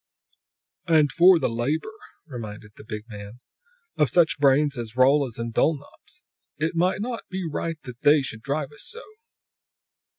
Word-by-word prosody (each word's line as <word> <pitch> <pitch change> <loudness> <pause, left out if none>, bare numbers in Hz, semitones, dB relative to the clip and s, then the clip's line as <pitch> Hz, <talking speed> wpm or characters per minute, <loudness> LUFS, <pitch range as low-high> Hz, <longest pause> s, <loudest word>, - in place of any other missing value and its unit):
"And 155 -4 +4
for 180 +4 +6
the - - 0
labor," 140 - -2 0.3
reminded 110 -6 -8
the - - -13
big 105 -1 -6
man, 105 +1 -10 0.6
"of 150 -4 +3
such 165 +2 +3
brains 140 +1 +3
as 115 -2 -6
Rolla's 130 -1 +3
and 115 0 -4
Dulnop's. 145 +1 -2 0.3
It 155 +3 -1
be 180 +3 +1
not 230 +3 -4 0.3
right 165 +2 -3
that 125 -3 -10
They 145 -1 +5
should 110 -4 -5
drive 140 +3 -3
us 145 - -10
so!" 470 +3 -9
140 Hz, 145 wpm, -24 LUFS, 120-160 Hz, 0.6 s, for